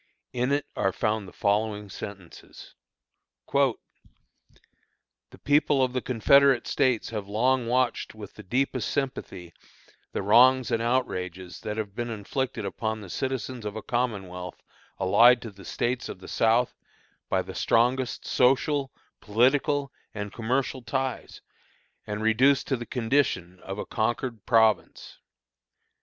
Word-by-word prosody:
In 125 +2 0
it 145 0 +1
are 95 - +1
found 105 0 -1
the - - -11
following 105 0 0
sentences: 95 -2 -10 0.8
"The 140 -4 +3 1.7
people 145 -1 +3
of 125 -1 0
the 125 - -1
Confederate 135 +2 +4
States 130 -6 +1
have 105 -3 -4
long 120 +4 +1
watched 125 -2 0
with 105 -2 -10
the - - -11
deepest 130 +3 -1
sympathy 95 -10 -4 0.6
the - - -3
wrongs 125 +4 +5
and 115 -1 +1
outrages 95 -7 -2
that 105 0 -4
have 105 -3 -4
been 120 +2 -4
inflicted 115 +2 -3
upon 110 +3 -3
the 95 -4 -9
citizens 130 -2 -3
of 105 0 -5
a 110 - -6
Commonwealth 95 -8 -3 0.4
allied 115 +6 +6
to 115 - -7
the 100 -2 -15
States 120 +6 -2
of - - -6
the 95 - -13
South 115 +2 +2 0.6
by - - +1
the - - -9
strongest 125 +2 +1
social, 135 +2 +2 0.3
political, 135 +5 +2 0.2
and 105 -1 -5
commercial 125 +2 -1
ties, 130 +1 -4 0.7
and 105 0 -4
reduced 130 +5 +4
to 135 - +2
the 120 -1 -7
condition 115 -8 0
of 95 +2 -7
a - - -4
conquered 115 0 -2
province. 110 -4 +2
115 Hz, 135 wpm, -26 LUFS, 105-130 Hz, 1.7 s, allied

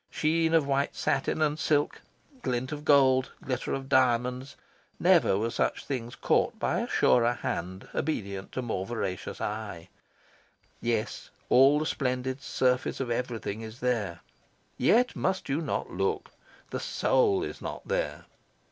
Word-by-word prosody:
Sheen 160 +1 +1
of 160 -3 +4
white 140 0 0
satin 155 - 0
and 150 0 0
silk, 145 -1 +1 0.4
glint 125 - -2
of 150 -1 -5
gold, 135 -3 +4
glitter 130 -2 -2
of 135 -1 -3
diamonds 125 0 +2 0.4
never 95 - +4
were 115 +3 -1
such - - -1
things 120 -4 -4
caught - - +1
by - - 0
surer 120 0 +3
hand 95 -5 -4
obedient 100 -10 -3
to 130 - -2
more 110 -6 -2
voracious 95 -4 -4
eye. 105 -6 -5 0.9
Yes, 115 -2 -2 0.2
all 135 +3 +6
the 155 - 0
splendid 130 -2 -2
surface 125 -2 0
of 130 -3 -2
everything 115 -3 -3
is 110 +2 -9
there. 110 -9 -1 0.5
Yet 245 +3 +3
must 190 -5 -1
you 140 +4 0
not - - -3
look. - - -1 0.4
The - - -2
soul 405 -6 +2
is - - -6
not - - -6
there. - - -2
130 Hz, 140 wpm, -28 LUFS, 115-145 Hz, 0.9 s, all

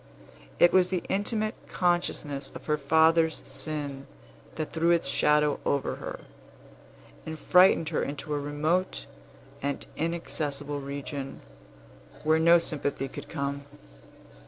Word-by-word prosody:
It 175 - +5
was 185 -1 +5
the 185 -2 -1
intimate 215 +2 0
consciousness 155 -6 -1
of - - -9
her 150 -1 0
father's 160 +2 +3
sin 140 -1 -4 0.5
that 155 -1 -4
threw 165 +1 +2
its 170 -4 +3
shadow 150 +1 +2
over 140 -1 0
her, - - -7 1.0
and 160 0 -6
frightened 180 -2 +5
her 160 - 0
into 145 +1 -4
a 145 - 0
remote 155 +6 -1 0.6
and 140 +1 -3
inaccessible 145 -3 -2
region, 140 0 -6 0.8
where 155 +1 +3
no 170 +1 +7
sympathy 145 -4 -1
could 145 +2 -9
come. 140 -2 -3
150 Hz, 120 wpm, -28 LUFS, 140-170 Hz, 1.0 s, no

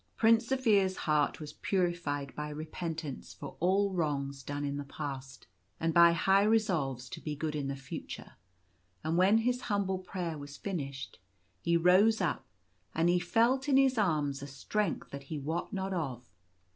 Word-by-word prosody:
Prince 230 +1 +4
Zaphir's 215 -8 +3
heart 150 -2 +2
was 150 -1 -7
purified 175 -7 -1
by 150 0 -4
repentance 155 -1 -5
for - - -8
all 195 +3 +2
wrongs 140 -5 -1
done 145 +2 -4
in 140 0 -2
the 145 - -3
past, 135 -2 -7 0.3
and 165 0 0
by 170 0 +8
high 190 +3 +4
resolves 175 - +1
to - - -7
be 150 -1 -4
good 150 +1 -3
in 145 -2 -2
the 140 - -2
future; 135 -1 -8 0.7
and 160 - 0
when 190 +5 +5
his 245 +2 +1
humble 200 -4 0
prayer 175 -4 -4
was 145 0 -9
finished, 140 - -5 0.4
he 170 0 +3
rose 190 +6 +5
up, 180 -5 -1 0.5
and 165 +2 +3
he 175 0 +4
felt 235 +10 +2
in 270 - +5
his 270 -1 +4
arms 150 - +1
a 140 - -6
strength 195 +10 -2
that 140 0 -7
he 155 - -3
wot 160 +5 -3
not 195 -1 -2
of. 135 -8 -3
170 Hz, 170 wpm, -31 LUFS, 145-195 Hz, 0.7 s, by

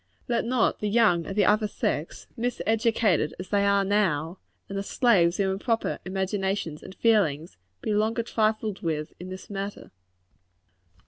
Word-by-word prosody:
Let 235 - 0
not 245 -1 +1
the 210 - -1
young 205 -7 +3
of 195 - -5
the 205 - +3
other 215 0 +3
sex, 155 -5 -3
miseducated 225 -7 +1
as 185 - -7
they 205 -1 +2
now 200 0 +3
are, 170 -4 +1 0.3
and 200 - -7
the 195 - -1
slaves 195 -5 +2
of 195 -1 +2
improper 225 +4 -1
imaginations 190 -3 -2
and 190 - -11
feelings, 175 -9 +1 0.3
be 215 - 0
longer 220 +3 +1
trifled 215 -2 -1
with 155 -2 -3
in 180 +1 -8
this 185 0 -8
matter. 200 0 -6
200 Hz, 150 wpm, -26 LUFS, 185-220 Hz, 0.3 s, young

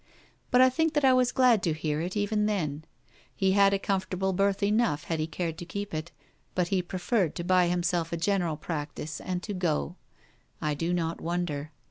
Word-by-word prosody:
But 250 - +5
I 260 0 +6
think 320 +4 +1
that 295 -2 +3
I 260 - +6
was 255 -1 +3
glad 250 -5 +4
to 165 -4 +1
hear 155 -1 -2
it, 180 +4 -3
even 210 +1 +1
then. 160 -7 -2 0.5
He 190 -1 +2
had 200 0 +5
a 200 - +2
comfortable 190 -1 -1
berth 200 +2 +1
enough 205 -7 +2
had 165 -2 -2
he 155 - -1
cared 165 0 -4
to - - -5
keep 200 +2 -5
it; 155 +2 -4 0.4
but 180 -1 +1
he 190 -2 +2
preferred 180 0 -1
to 170 - -3
buy 180 0 +4
himself 175 -1 0
a 170 - -1
general 175 -3 0
practice 150 -1 -5
and 180 0 -3
to 210 - -4
go. 175 -1 -1 0.6
I 150 -2 -1
do 165 +4 -2
not 165 -2 -1
wonder. 160 -4 -2
180 Hz, 200 wpm, -28 LUFS, 165-200 Hz, 0.6 s, I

